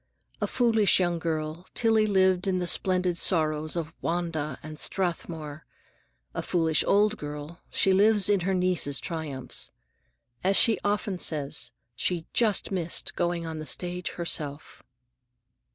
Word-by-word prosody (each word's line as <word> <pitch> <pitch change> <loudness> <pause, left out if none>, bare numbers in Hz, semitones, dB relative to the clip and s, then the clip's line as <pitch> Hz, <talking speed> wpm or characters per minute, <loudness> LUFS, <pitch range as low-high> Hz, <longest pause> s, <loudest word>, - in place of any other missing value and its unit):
A - - +1
foolish 225 -6 +3
young 175 -2 0
girl, 160 +1 -3
Tillie 225 -2 +3
lived 190 -2 +2
in 185 -1 +1
the 180 - -1
splendid 180 -1 +1
sorrows 155 -2 +2
of 160 -2 -4
"Wanda" 165 -5 -2
and 155 0 -8
"Strathmore"; 160 -5 -3 0.7
a - - -3
foolish 165 -3 +2
old 210 +1 +3
girl, 150 +1 -8
she 190 - +3
lives 205 0 +4
in 205 -1 +3
her 190 +2 0
niece's 180 -6 +1
triumphs. 155 -6 -2 0.7
As 195 +1 +3
she 225 - +5
often 205 -2 -1
says, 145 -5 -2 0.3
she 170 +5 -1
just 220 -4 +2
missed 175 -3 -1
going 175 -1 -1
on 160 -1 -5
the 155 - -6
stage 180 0 -1
herself. 155 -4 -4
175 Hz, 135 wpm, -27 LUFS, 155-190 Hz, 0.7 s, she